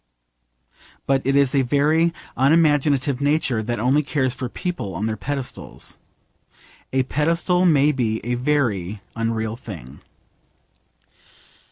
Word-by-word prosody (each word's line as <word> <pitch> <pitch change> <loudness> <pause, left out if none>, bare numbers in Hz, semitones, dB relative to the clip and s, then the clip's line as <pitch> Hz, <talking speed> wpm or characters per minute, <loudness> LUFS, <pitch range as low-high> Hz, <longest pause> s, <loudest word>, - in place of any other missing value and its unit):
But 135 -1 +2
it 135 +1 +2
is 140 -2 +3
a 140 - +4
very 150 +6 +2 0.2
unimaginative 145 -2 +3
nature 145 -5 +1
that 120 +1 -3
only 130 +6 +3
cares 130 -3 -1
for 130 -2 -5
people 125 - -4
on 100 +6 -2
their 110 -1 -1
pedestals. 135 +3 -6 0.9
A 130 0 +2
pedestal 170 +6 +1
may 150 -2 +4
be 115 -5 -1
a 120 - -1
very 120 -8 -1
unreal 115 -1 -2
thing. 85 - -10
135 Hz, 120 wpm, -22 LUFS, 115-145 Hz, 0.9 s, a